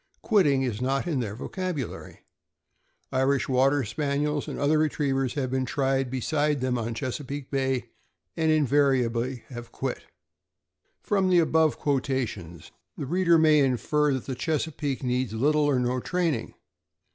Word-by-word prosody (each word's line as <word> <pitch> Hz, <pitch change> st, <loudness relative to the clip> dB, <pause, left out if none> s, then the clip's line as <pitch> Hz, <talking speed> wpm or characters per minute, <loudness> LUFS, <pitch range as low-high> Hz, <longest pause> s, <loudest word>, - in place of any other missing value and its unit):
Quitting 150 Hz, -, +3 dB
is 120 Hz, -3 st, -3 dB
not 135 Hz, +2 st, 0 dB
in 160 Hz, -6 st, -1 dB
their 105 Hz, -4 st, -3 dB
vocabulary. 175 Hz, -, -5 dB, 0.9 s
Irish 130 Hz, +1 st, +1 dB
Water 135 Hz, +2 st, +3 dB
Spaniels 145 Hz, +4 st, -1 dB
and -, -, -5 dB
other 150 Hz, +2 st, +2 dB
retrievers 135 Hz, -4 st, 0 dB
have 130 Hz, -3 st, -2 dB
been 130 Hz, 0 st, 0 dB
tried 135 Hz, -1 st, 0 dB
beside 145 Hz, +3 st, 0 dB
them 130 Hz, 0 st, 0 dB
on 120 Hz, -2 st, -2 dB
the 115 Hz, -, -3 dB
Chesapeake 135 Hz, +3 st, -5 dB
Bay, 135 Hz, -2 st, -1 dB, 0.4 s
and 160 Hz, -1 st, +1 dB
inva 155 Hz, -3 st, +3 dB, 0.3 s
riably 120 Hz, 0 st, -1 dB
have 120 Hz, -2 st, -9 dB
quit. -, -, -4 dB, 1.0 s
From 195 Hz, -2 st, +1 dB
the 180 Hz, -, +4 dB
above 160 Hz, -2 st, +3 dB
quotations, 130 Hz, -, -2 dB, 0.3 s
the -, -, -4 dB
reader 170 Hz, +3 st, +3 dB
may 155 Hz, -1 st, +5 dB
infer 140 Hz, +3 st, +2 dB
that 130 Hz, -, -5 dB
the 135 Hz, -, -3 dB
Chesapeake 145 Hz, 0 st, -2 dB
needs 125 Hz, -2 st, -1 dB
little 150 Hz, +6 st, +2 dB
or 145 Hz, -3 st, +2 dB
no 125 Hz, +1 st, 0 dB
training. 175 Hz, +2 st, -2 dB
135 Hz, 145 wpm, -26 LUFS, 130-150 Hz, 1.0 s, may